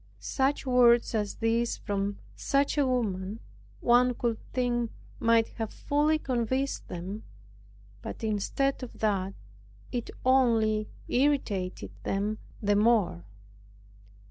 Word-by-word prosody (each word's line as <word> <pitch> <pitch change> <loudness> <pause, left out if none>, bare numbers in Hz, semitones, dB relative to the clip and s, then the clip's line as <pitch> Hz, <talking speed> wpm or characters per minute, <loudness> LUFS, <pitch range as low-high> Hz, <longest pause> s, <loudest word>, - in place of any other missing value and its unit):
Such 270 +1 0
words 240 -2 +5
as 210 -2 -1
these, 230 +1 0
from 200 0 -2 0.2
such 280 0 +1
a 285 -3 +2
woman, 210 -5 -1 0.4
one 245 +1 +4
would 230 -2 +1
think 240 -2 0 0.3
might 230 -1 +3
have 220 -1 -2
fully 300 +2 +1
convinced 260 0 -1
them; 185 +5 -6 0.8
but - - -7
instead 220 +7 0
of 255 - -8
that, 195 -3 0 0.6
it 240 -2 -3 0.2
only 225 -5 +3 0.2
irritated 245 -9 0
them 205 +2 -1 0.2
the 205 0 +3
more. 210 - +2
230 Hz, 110 wpm, -29 LUFS, 205-255 Hz, 0.8 s, words